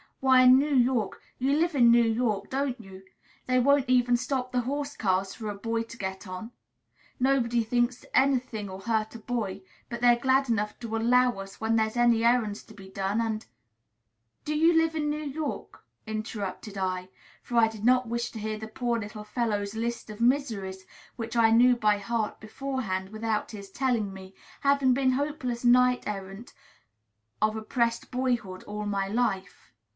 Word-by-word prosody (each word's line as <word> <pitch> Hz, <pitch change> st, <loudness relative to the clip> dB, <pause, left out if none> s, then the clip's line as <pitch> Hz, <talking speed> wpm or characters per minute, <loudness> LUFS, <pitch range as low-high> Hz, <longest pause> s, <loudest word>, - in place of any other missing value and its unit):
Why, 260 Hz, -1 st, +5 dB
in 255 Hz, 0 st, +8 dB
New 290 Hz, 0 st, 0 dB
York 245 Hz, -5 st, +1 dB, 0.2 s
(you 265 Hz, +2 st, +1 dB
live 335 Hz, +3 st, +1 dB
in 240 Hz, -4 st, +6 dB
New 235 Hz, 0 st, +6 dB
York, 225 Hz, -3 st, 0 dB
don't 270 Hz, -2 st, -2 dB
you?) 190 Hz, -3 st, -12 dB, 0.4 s
they 255 Hz, 0 st, +3 dB
won't 280 Hz, +1 st, +3 dB
even 245 Hz, -1 st, +4 dB
stop 255 Hz, 0 st, -2 dB
the 250 Hz, -, +1 dB
horse 285 Hz, +3 st, -3 dB
cars 190 Hz, -1 st, 0 dB
for 220 Hz, -2 st, -6 dB
a 205 Hz, -, -4 dB
boy 225 Hz, +3 st, -2 dB
to 230 Hz, 0 st, -12 dB
get 190 Hz, 0 st, -5 dB
on. 185 Hz, +6 st, -7 dB, 0.7 s
Nobody 245 Hz, -3 st, +2 dB
thinks 240 Hz, +2 st, 0 dB
any 270 Hz, 0 st, +4 dB
thing'll 205 Hz, -6 st, -7 dB
hurt 220 Hz, 0 st, -1 dB
a -, -, -7 dB
boy; 210 Hz, -5 st, -3 dB, 0.3 s
but 235 Hz, 0 st, -6 dB
they're 240 Hz, -1 st, +5 dB
glad 265 Hz, +2 st, +2 dB
enough 210 Hz, -2 st, -1 dB
to 230 Hz, -2 st, -4 dB
'allow' 245 Hz, +1 st, +3 dB
us 195 Hz, 0 st, -9 dB
when 225 Hz, 0 st, +1 dB
there's 220 Hz, +1 st, 0 dB
any 235 Hz, -1 st, +4 dB
errands 230 Hz, -3 st, +2 dB
to 220 Hz, -, -15 dB
be 195 Hz, -1 st, -12 dB
done, 195 Hz, +2 st, -2 dB
and" 220 Hz, -1 st, -2 dB, 1.0 s
"Do 300 Hz, -, -1 dB
you 325 Hz, +2 st, +4 dB
live 325 Hz, 0 st, +2 dB
in 300 Hz, -1 st, -1 dB
New 300 Hz, +1 st, -2 dB
York?" 295 Hz, +1 st, -5 dB, 0.2 s
interrupted 215 Hz, -2 st, -5 dB
I; 185 Hz, -1 st, -2 dB, 0.3 s
for 240 Hz, -, -3 dB
I 225 Hz, -1 st, +6 dB
did 220 Hz, -2 st, -8 dB
not 255 Hz, 0 st, +4 dB
wish 235 Hz, +1 st, -2 dB
to 225 Hz, -, -7 dB
hear 215 Hz, 0 st, -4 dB
the 220 Hz, -, -6 dB
poor 235 Hz, +1 st, -2 dB
little 210 Hz, 0 st, -7 dB
fellow's 210 Hz, -2 st, -2 dB
list 235 Hz, 0 st, -3 dB
of 210 Hz, +2 st, -9 dB
miseries, 220 Hz, -8 st, 0 dB, 0.3 s
which 230 Hz, -1 st, -6 dB
I 230 Hz, -1 st, +5 dB
knew 245 Hz, +2 st, +5 dB
by 210 Hz, -3 st, +2 dB
heart 220 Hz, +1 st, -2 dB
beforehand 215 Hz, -5 st, -4 dB
without 220 Hz, 0 st, -2 dB
his 200 Hz, -3 st, -9 dB
telling 235 Hz, -5 st, 0 dB
me, 190 Hz, 0 st, -11 dB, 0.3 s
having 280 Hz, -2 st, +3 dB
been 260 Hz, 0 st, +2 dB
hopeless 260 Hz, -3 st, -2 dB
knight 250 Hz, +1 st, +4 dB
errant 195 Hz, +2 st, -6 dB, 0.9 s
of 215 Hz, 0 st, +2 dB
oppressed 230 Hz, +1 st, -1 dB
boyhood 245 Hz, -7 st, -2 dB
all 210 Hz, 0 st, -5 dB
my 200 Hz, -1 st, -1 dB
life. 200 Hz, -4 st, -2 dB
230 Hz, 180 wpm, -27 LUFS, 210-255 Hz, 1.0 s, in